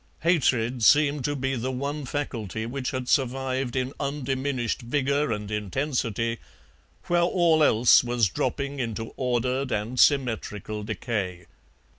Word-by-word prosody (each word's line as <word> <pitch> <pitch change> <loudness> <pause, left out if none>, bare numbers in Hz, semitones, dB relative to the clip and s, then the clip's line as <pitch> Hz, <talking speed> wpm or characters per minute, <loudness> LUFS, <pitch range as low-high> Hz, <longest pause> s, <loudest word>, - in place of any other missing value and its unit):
Hatred 125 -8 +1
seemed 145 +1 +4
to 145 - 0
be 135 0 -1
the 125 +2 -2
one 140 +3 -3
faculty 115 -7 -4
which 125 +2 -3
had 130 -1 -4
survived 130 -1 0
in 130 +1 -1
undiminished 135 -3 -2
vigour 140 +2 0
and 105 -1 -4
intensity 115 - -2 0.6
where 175 0 +1
all 170 -3 +3
else 120 -2 +6
was 120 -3 +2
dropping 140 +9 -2
into 115 -2 -4
ordered 125 +1 -1
and 110 +4 -2
symmetrical 110 -6 +1
decay. 95 -4 -3
130 Hz, 125 wpm, -26 LUFS, 115-140 Hz, 0.6 s, else